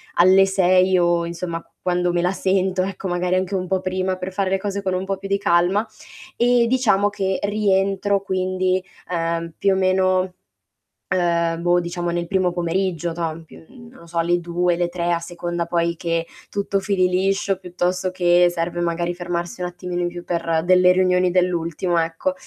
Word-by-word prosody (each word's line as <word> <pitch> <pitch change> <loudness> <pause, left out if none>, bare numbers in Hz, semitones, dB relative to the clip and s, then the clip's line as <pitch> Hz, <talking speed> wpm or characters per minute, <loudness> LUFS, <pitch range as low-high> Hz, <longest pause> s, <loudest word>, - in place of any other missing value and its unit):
alle 190 +2 +6
6 185 -1 +3
o 175 -1 +2
insomma 170 0 -5 0.2
quando 180 -1 0
me 175 - +1
la 180 +1 +1
sento 190 -1 0
ecco, 195 0 -5
magari 180 +1 0
anche 185 +1 -1
un 185 -1 -2
po' 190 0 0
prima 185 0 -1
per 185 +1 -6
fare 195 0 -1
le 195 - +2
cose 200 0 -3
con 185 -1 -1
un 185 +1 -1
po' 195 0 -2
più 195 - -7
di 200 0 +1
calma 180 +4 +2 0.5
e 240 0 +4
diciamo 210 -6 +3
che 190 -2 -2
rientro 200 -1 +1
quindi, 185 -1 0 0.3
ehm, 165 -1 -2
più 195 -1 +2
o - - +1
meno, 185 -1 +2 0.8
ehm, 170 -2 +1
boh, 175 +1 +3
diciamo 175 0 -3
nel 170 0 -2
primo 185 -1 +1
pomeriggio, 175 0 -1
toh, 165 -1 -2
in 165 0 -12
p 160 - -15
non 240 -1 -15
lo 170 - -15
so 170 0 -7
alle 175 +1 +2
2, 175 +1 0
le 175 0 +1
3 175 0 -2
a 170 - +1
seconda 175 0 -4
poi 170 0 0
che 165 -1 -1 0.2
tutto 200 0 -1
fili 190 -2 +1
liscio, 195 +1 0
piuttosto 180 0 -2
che 175 -1 +4
serve 175 0 -3
magari 170 +1 -1
fermarsi 175 0 -4
un 180 - -1
attimino 180 0 -5
in 175 - 0
più 175 0 -8
per 165 -2 -1
delle 180 0 +5
riunioni 180 -1 +2
dell'ultimo, 175 -1 0
ecco. 165 +12 -1
180 Hz, 185 wpm, -21 LUFS, 175-190 Hz, 0.8 s, alle